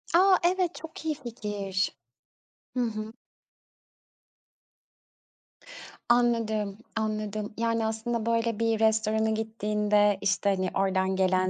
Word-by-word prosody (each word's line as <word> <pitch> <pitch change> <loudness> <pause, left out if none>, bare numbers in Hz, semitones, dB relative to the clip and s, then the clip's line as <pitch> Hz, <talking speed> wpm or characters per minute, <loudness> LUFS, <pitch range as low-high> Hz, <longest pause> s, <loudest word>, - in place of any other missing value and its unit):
A, 375 +1 +6
evet 360 0 +1
çok 320 -1 -9
iyi 310 -1 0
fikir. 205 -7 -3 0.9
Hı - - +1
hı. 215 -1 -4 3.0
Anladım, 225 -4 +2 0.2
anladım. 215 -1 -2
Yani, 230 -1 0
aslında 225 +1 -2
böyle 230 -1 0
bir 225 -1 +1
restorana 220 0 +2
gittiğinde, 210 -2 +1
işte, 200 0 +1
hani, 185 -2 0
oradan 190 -1 +1
gelen 185 0 +2
220 Hz, 100 wpm, -28 LUFS, 205-230 Hz, 3.0 s, A